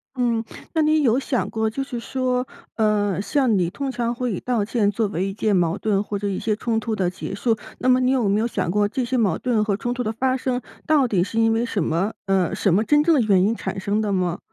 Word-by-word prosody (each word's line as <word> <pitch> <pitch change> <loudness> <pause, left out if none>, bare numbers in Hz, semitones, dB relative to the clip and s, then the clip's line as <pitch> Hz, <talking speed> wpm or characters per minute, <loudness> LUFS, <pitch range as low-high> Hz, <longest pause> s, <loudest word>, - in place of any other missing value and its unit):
嗯， 235 -3 0 0.3
那 320 - +2
你 310 0 +3
有 245 -1 +3
想 260 -2 -1
过， 220 0 -1
就 270 +5 -3
是 250 -3 -5
说， 255 +1 -1 0.3
呃， 205 -3 +1
像 230 +1 +1
你 175 -2 +1
通 275 +8 -4
常 240 -1 -1
会 245 -2 -2
以 180 - -3
道 235 -5 -1
歉 215 -2 +1
作 210 +1 0
为 185 0 -2
一 195 - -4
件 210 0 +1
矛 170 -2 +1
盾 205 -2 0
或 205 -1 -4
者 200 +1 -3
一 195 -2 -2
些 215 -2 0
冲 225 +1 -1
突 220 0 -3
的 185 -4 0
结 185 - -7
束。 225 +3 +1 0.2
那 255 - -2
么 255 0 +5
你 255 0 +2
有 250 -5 +2
没 200 +1 +2
有 225 - +1
想 230 - -2
过 205 +2 +2
这 250 +4 -2
些 255 +2 -2
矛 205 -8 +2
盾 235 -4 +1
和 205 -2 0
冲 240 +3 -2
突 245 0 -3
的 220 - -1
发 255 +3 0
生， 255 -1 -1 0.3
到 295 -4 +4
底 190 -6 +1
是 225 +4 -2
因 225 0 +3
为 225 +1 +1
什 210 -6 -1
么 170 +7 0
呃， 190 -3 +1
什 195 - +1
么 205 +5 +3
真 295 +6 +3
正 335 +1 +4
的 275 - +3
原 200 -5 +3
因 215 +4 +2
产 195 - -4
生 200 +3 0
的 210 -2 -1
吗？ 180 -3 0
220 Hz, 290 characters per minute, -22 LUFS, 200-250 Hz, 0.3 s, 么